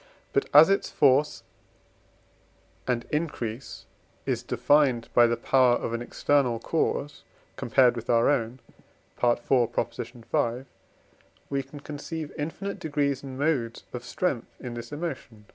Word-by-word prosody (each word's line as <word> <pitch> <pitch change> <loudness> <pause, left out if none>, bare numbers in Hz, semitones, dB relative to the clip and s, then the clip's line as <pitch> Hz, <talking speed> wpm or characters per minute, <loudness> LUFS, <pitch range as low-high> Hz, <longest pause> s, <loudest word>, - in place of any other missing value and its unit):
But, 415 - +1
as 150 +2 +9
its 195 0 +1
force 140 +1 +3 1.4
and 120 -2 0
increase 135 -6 -4 0.4
is - - -1
defined 140 -6 +2
by 120 -1 +6
the 120 0 0
power 125 0 +4
of 115 - -3
an 115 - -2
external 125 -1 +1
cause 145 +2 -2 0.3
compared 125 -2 +3
with 115 -1 -7
our 115 -1 +4
own 125 -2 0 0.6
(IV. 120 -1 +3
v.), 120 -1 -1 0.9
we 140 0 0
can 140 +2 -12
conceive 150 +1 -6
infinite 175 +7 -4
degrees 145 -3 -1
and 135 -2 -8
modes 135 -6 -1
of 125 -1 -5
strength 135 -9 -2
in 125 -2 -6
this 120 +1 -7
emotion 140 -9 -6
(IV. - - -35
130 Hz, 130 wpm, -27 LUFS, 120-145 Hz, 1.4 s, as